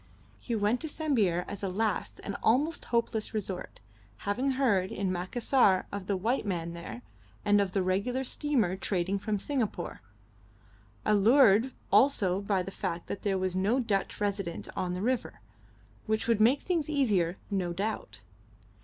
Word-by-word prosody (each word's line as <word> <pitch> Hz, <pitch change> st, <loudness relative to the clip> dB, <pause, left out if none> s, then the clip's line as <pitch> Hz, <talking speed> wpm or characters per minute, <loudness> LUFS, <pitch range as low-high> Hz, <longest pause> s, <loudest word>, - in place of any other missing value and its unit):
He 235 Hz, -, -2 dB
went 215 Hz, +3 st, +1 dB
to 320 Hz, -, -3 dB
Sambir 220 Hz, -, +1 dB
as 205 Hz, -, -6 dB
a 195 Hz, -, -1 dB
last 210 Hz, +2 st, -1 dB
and 200 Hz, -, -4 dB
almost 290 Hz, +9 st, +2 dB
hopeless 230 Hz, -2 st, -1 dB
resort, 190 Hz, -3 st, -4 dB, 0.5 s
having 255 Hz, +7 st, 0 dB
heard 215 Hz, -9 st, +2 dB
in 195 Hz, -2 st, -1 dB
Macassar 190 Hz, +2 st, +2 dB
of 200 Hz, -2 st, -5 dB
the 200 Hz, -, 0 dB
white 230 Hz, +8 st, 0 dB
man 170 Hz, -4 st, -3 dB
there, 120 Hz, -9 st, -8 dB, 0.4 s
and 205 Hz, 0 st, +5 dB
of 190 Hz, -2 st, -2 dB
the 195 Hz, -, +1 dB
regular 200 Hz, +8 st, 0 dB
steamer 255 Hz, -, 0 dB
trading 190 Hz, 0 st, -1 dB
from 210 Hz, +1 st, -1 dB
Singapore 220 Hz, -6 st, -3 dB, 1.0 s
allured 225 Hz, +2 st, +5 dB, 0.2 s
also 200 Hz, -9 st, +4 dB
by 200 Hz, -2 st, 0 dB
the 195 Hz, -, -7 dB
fact 175 Hz, -3 st, -4 dB
that 200 Hz, -, -5 dB
there 195 Hz, -2 st, 0 dB
was 185 Hz, -1 st, -1 dB
no 205 Hz, +7 st, +2 dB
Dutch 205 Hz, -6 st, -1 dB
resident 200 Hz, -4 st, -2 dB
on 180 Hz, -1 st, -1 dB
the 180 Hz, +2 st, -3 dB
river, 250 Hz, +1 st, -1 dB, 0.7 s
which 220 Hz, +1 st, 0 dB
would 230 Hz, -2 st, +3 dB
make 250 Hz, +6 st, +5 dB
things 335 Hz, -5 st, 0 dB
easier, 205 Hz, -, +1 dB
no 185 Hz, -3 st, 0 dB
doubt. 205 Hz, +5 st, -4 dB
205 Hz, 155 wpm, -29 LUFS, 185-240 Hz, 1.0 s, and